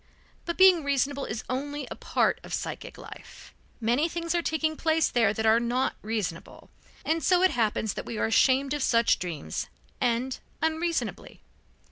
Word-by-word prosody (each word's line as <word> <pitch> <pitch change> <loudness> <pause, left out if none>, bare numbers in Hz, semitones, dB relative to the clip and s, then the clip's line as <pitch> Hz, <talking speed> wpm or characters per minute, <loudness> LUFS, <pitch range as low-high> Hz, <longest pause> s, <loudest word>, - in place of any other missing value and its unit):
But 340 - -3
being 375 -4 +6
reasonable 280 0 0
is 220 0 -5
only 285 +3 -3
a - - -4
part - - 0
of - - -4
psychic - - -6
life. - - -12 0.3
Many 245 +8 +1
things 335 0 -3
are 345 - +1
taking 315 -1 -1
place 320 0 +2
there 230 -4 +3
that 220 +1 -2
are 220 +1 +5
not 245 +2 0
reasonable, 210 -6 -5 0.3
and 325 +1 0
so 365 0 +4
it 375 - +5
happens 220 -2 0
that - - -6
we 230 - -5
are - - +1
ashamed 265 +4 +3
of 295 - -2
such 230 -2 +3
dreams, 160 - -4 0.3
and 250 +1 0 0.2
unreasonably. 320 +1 -2
270 Hz, 165 wpm, -27 LUFS, 230-320 Hz, 0.3 s, being